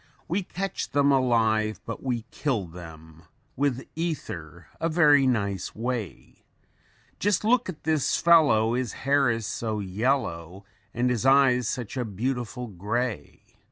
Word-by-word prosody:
WE 185 +5 0
CATCH 195 +1 -4
THEM 145 0 +4
ALIVE, 110 -5 +2
BUT 115 - -6
WE 125 -4 -2
KILL 125 -10 -1
THEM, 80 -2 -12 0.3
WITH 135 -2 -1
ETHER 85 - -5
A 165 - 0
VERY 150 -4 +5
NICE 100 -7 -1
WAY: 115 -3 -5 0.8
Just 205 -1 +1
look 240 0 +2
at 165 - -8
this 155 -3 +1
fellow 145 -10 +4
his 125 -2 -2
hair 140 -1 +3
is 115 -2 -1
so 110 -1 -3
yellow, 100 -4 -2 0.3
And 125 +1 0
his 120 -3 -1
eyes 135 -3 +4
such 120 0 -4
a 125 - 0
beautiful 125 +3 -3
gray. 110 +3 -4
125 Hz, 135 wpm, -26 LUFS, 105-140 Hz, 0.8 s, VERY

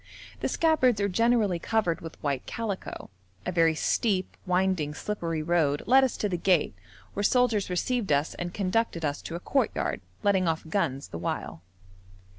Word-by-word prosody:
The - - -1
scabbards 275 -9 +3
are 200 - +2
generally 215 -2 +2
covered 190 -3 0
with 165 -1 -8
white 140 -3 -2
calico. 210 - -5 0.3
A - - -1
very 165 -2 +3
steep, 190 +4 0
winding, 180 -5 +1
slippery 165 -6 -3
road 155 -4 +1
led 265 +3 +6
us 260 - 0
to 210 - 0
the 180 -3 -2
gate, 175 -2 +2 0.4
where 205 - -2
soldiers 225 -3 +2
received 205 +3 -1
us 145 +2 +2
and 175 0 -5
conducted 190 -3 0
us 145 -1 -2
to 165 - -6
a - - -3
courtyard, 270 +8 0 0.2
letting 190 -3 +3
off 160 0 -1
guns 160 -6 -1
the 85 - -6
while. 80 -1 -4
185 Hz, 165 wpm, -27 LUFS, 165-215 Hz, 0.4 s, led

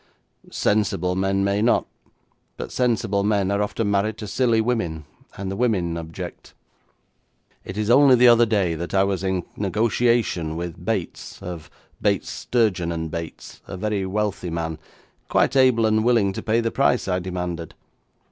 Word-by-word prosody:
'Sensible 90 -4 0
men 95 +1 +1
may 100 +1 +1
not, 115 - +3 0.7
but - - -6
sensible 115 -5 0
men 100 -2 +1
are 100 0 +1
often 105 0 -1
married 100 +2 0
to 105 - -6
silly 115 +2 +1
women, 100 -10 -1 0.3
and 95 -1 -4
the - - -3
women 95 -8 0
object. 80 -1 -8 1.1
It 95 - -8
is 105 +1 0
only 135 +1 +7
the 125 0 +6
other 120 0 +6
day 100 -6 +1
that 85 +4 -4
I 95 - +5
was 95 -1 -1
in 95 -2 -1
negotiation 105 -5 +1
with 85 0 -6
Bates, - - -4
of 85 -2 -7 0.3
Bates, - - 0
Sturgeon 105 -8 0
and 80 -1 -4
Bates, 85 -1 -7
a - - -6
very 105 0 -1
wealthy 100 -2 -2
man, 80 -1 -3 0.5
quite - - +2
able 130 -4 +4
and 110 0 +2
willing 115 -5 +3
to - - -5
pay 115 +2 +1
the 115 0 -1
price 130 -4 +1
I 90 -1 0
demanded. 90 -2 -5
100 Hz, 160 wpm, -23 LUFS, 90-115 Hz, 1.1 s, only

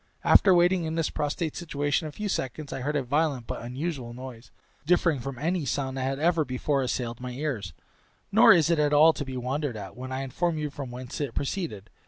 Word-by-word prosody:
After 190 -3 +6
waiting 175 0 +3
in 160 0 -3
this 165 -2 0
prostrate 150 +2 -2
situation 145 -2 -1
a - - -7
few 210 +7 -4
seconds, 140 - -3
I 135 - -4
heard 145 +4 -2
a 140 - +1
violent 140 -1 0
but - - -5
unusual 125 0 -4
noise, 125 -2 -9 0.3
differing 165 -2 +2
from 130 +1 -6
any 170 +5 -1
sound 135 0 -2
that 135 - -3
had 135 +1 -1
ever 165 +1 +2
before 135 +1 -1
assailed 120 -2 -2
my 125 0 -5
ears; 120 - -3 0.6
nor - - +8
is 165 0 +5
it 165 - +2
at 150 0 +2
all 155 +2 +7
to 145 - -4
be 130 -2 -6
wondered 130 0 -2
at, 100 -1 -8
when 130 +1 -7
I 130 +1 -2
inform 160 +5 -1
you 150 -1 -3
from 140 -3 -6
whence 125 +3 -6
it 140 -5 -3
proceeded. 140 - -3
145 Hz, 220 wpm, -27 LUFS, 125-160 Hz, 0.6 s, nor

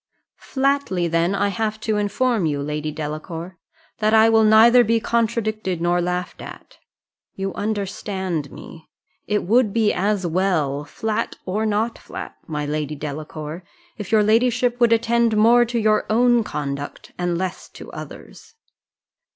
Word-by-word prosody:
"Flatly 270 -10 0
then 170 +3 +1
I 200 +1 +1
have 215 +2 -2
to 215 -1 0
inform 210 -1 0
you, 145 -2 -1
Lady 150 +1 -3
Delacour, 160 +4 -6 0.4
that 215 0 +3
I 220 +1 +6
will 225 0 +4
neither 225 +3 +7
be 230 0 +2
contradicted 220 -5 -1
nor 175 +1 +1
laughed 180 +1 -3
at - - -12 0.6
you 195 0 -3
understand 190 -6 -3
me, 160 -2 -12 0.4
it 210 -1 0
would 225 +2 +3
be 220 -1 +2
as 195 0 0
well, 160 -5 0
flat 220 +5 -3
or 210 +4 -1
not 215 +2 -1
flat, - - -8
my 150 -2 -3
Lady 150 0 -3
Delacour, 155 +3 -6 0.3
if 205 -3 -7
your 215 -1 +5
ladyship 245 +3 +2
would 235 -1 +4
attend 230 -1 +2
more 235 +3 +5
to 240 +1 -3
your 215 -1 +2
own 240 +1 +4
conduct, 145 -5 -5
and 175 -1 0
less 185 0 -4
to - - -12
others!" - - -11
205 Hz, 145 wpm, -21 LUFS, 170-225 Hz, 0.6 s, neither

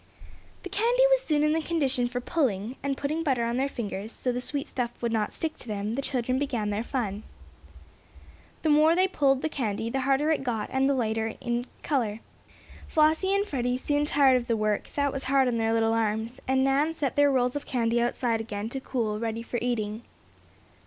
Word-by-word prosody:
The - - -6
candy 475 +4 +2
was - - +5
soon 300 -10 +1
in 300 0 +3
the 325 - +1
condition 275 -7 0
for 245 0 -3
"pulling" 245 - -1
and, 275 -1 -2
putting 305 +3 -1
butter 260 -7 +1
on 235 +1 -1
their 270 +2 +1
fingers, 215 -4 -5
so 250 - -2
the 245 +1 -3
sweet 285 +2 -3
stuff 240 -2 -4
would 235 -1 -1
not 215 -2 0
stick 320 -1 -4
to - - -11
them, 210 0 -3
the 270 - -1
children 255 -1 -1
began 240 -7 -1
their 205 +1 -1
fun. 220 -5 -3 1.4
The 315 - +2
more 310 +2 +5
they 370 +1 +4
pulled 275 -7 +2
the - - +2
candy 230 -6 -2
the 270 - -1
harder 275 +4 +2
it 300 - 0
got, 225 -5 -2
and 265 +1 +2
the 280 - +2
lighter 225 -2 -1
in 240 0 -2 0.2
color, 230 -7 0 0.7
Flossie 320 +5 +3
and 400 +1 +1
Freddie 250 -7 -1
soon 290 +2 0
tired 275 -3 +4
of 240 -1 -4
the 230 - +1
work, 215 -1 -1
that 285 -1 +1
was 275 - -4
hard 270 0 +3
on 240 -2 0
their 225 0 +1
little 225 0 +2
arms, 220 +1 -1
and 265 0 +3
Nan 285 +4 +2
set 280 -5 -2
their 285 0 +5
rolls 250 -1 +1
of 290 - -4
candy 235 -2 +1
outside 235 -1 0
again 215 -1 -4
to 270 - -4
cool, 225 -5 -2
ready 230 0 -3
for 240 +1 -3
eating. 220 -3 -2
255 Hz, 210 wpm, -27 LUFS, 225-285 Hz, 1.4 s, was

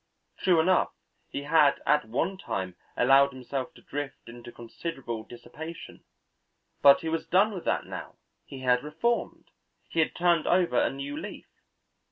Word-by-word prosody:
True 180 -3 +3
enough 185 +3 +3 0.4
he 140 - -5
had 150 -1 +4
at 150 -5 +3
one 165 +11 -1
time 95 - -4 0.2
allowed 135 +2 +5
himself 130 +1 -5
to - - -17
drift 145 -1 -6
into 120 0 -10
considerable 120 -1 -6
dissipation, 120 +9 -10 0.8
but 140 -1 +7
he 165 - -5
was 160 0 -2
done 205 +4 +3
with 185 - -7
that - - 0
now, - - -8 0.3
he 135 - -10
had 125 0 +2
reformed, 165 +11 -2 0.4
he 165 - -2
had 160 - +2
turned 170 -2 +2
over 175 -9 +3
a - - +2
new 140 +1 -5
leaf. - - -7
145 Hz, 155 wpm, -28 LUFS, 125-165 Hz, 0.8 s, but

